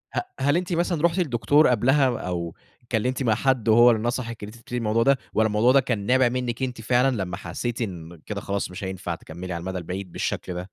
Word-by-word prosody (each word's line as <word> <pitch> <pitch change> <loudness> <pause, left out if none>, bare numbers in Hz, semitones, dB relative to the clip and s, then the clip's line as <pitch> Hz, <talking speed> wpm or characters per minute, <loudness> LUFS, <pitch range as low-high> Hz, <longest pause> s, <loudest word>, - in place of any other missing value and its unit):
ه - - +2 0.2
هل 145 +4 +2
أنتِ 180 0 -2
مثلًا 170 -2 0
رُحتِ 170 +2 +2
لدكتور 145 0 +3
قبْلها 130 +2 +3
أو 85 -2 -4 0.3
اتكلّمتِ 125 +3 -1
مع 110 -3 +3
حد 130 -5 +1
وهو 120 +2 +7
اللي 110 -2 0
نصَحِك 115 -2 -3
إن - - -5
أنتِ 110 - -13
تبتدي 120 +2 -6
الموضوع 115 0 +1
ده، 140 -1 +4 0.2
والّا 110 0 +3
الموضوع 110 +4 +3
ده 135 - +6
كان 120 -6 -2
نابِع 130 +1 +4
منِك 125 0 -3
أنتِ 125 -3 -3
فعلًا 125 +3 +2
لمّا 90 -1 -5
حسّيتِ 120 +4 -4
إن 85 -6 -6
كده 100 -2 -4
خلاص 100 -1 -3
مش 90 - -7
هينفع 95 -2 -4
تكمّلي 85 +3 -8
على 85 - -4
المدى 95 +1 -4
البعيد 90 +2 -6
بالشكل 90 - -3
ده؟ 90 - -4
115 Hz, 225 wpm, -24 LUFS, 95-130 Hz, 0.3 s, وهو